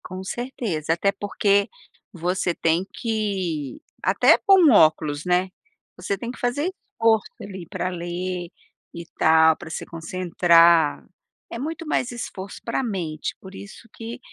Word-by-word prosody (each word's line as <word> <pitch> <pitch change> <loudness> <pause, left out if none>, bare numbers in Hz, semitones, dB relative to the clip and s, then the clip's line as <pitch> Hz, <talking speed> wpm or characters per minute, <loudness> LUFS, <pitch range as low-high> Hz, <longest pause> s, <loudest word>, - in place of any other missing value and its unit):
Com 185 +1 -7
certeza, 195 - -3
até 195 +4 +1
porque 200 0 +1 0.4
você 180 -1 -1
tem 165 +3 +1
que 190 - -3 0.2
até - - +5
com 375 -7 +6
óculos, 155 -4 +3
né, 180 +1 +1 0.5
você 190 +2 -3
tem 235 +4 -5
que - - -12
fazer 285 +9 -1 0.2
esforço 225 - +2
ali 190 -4 -8
pra 180 - -3
ler 175 0 -4 0.4
e 170 0 -8
tal, 160 0 +5
pra 175 - -10
se 160 - -5
concentrar, 170 -2 +3 0.5
é 230 - -5
muito 325 +5 -5
mais 250 -4 0
esforço 200 -5 -7
para 230 +3 -1
mente, 170 -9 -4
por 190 0 -12
isso 200 +4 -11
que 230 +2 -7
185 Hz, 140 wpm, -23 LUFS, 170-225 Hz, 0.5 s, com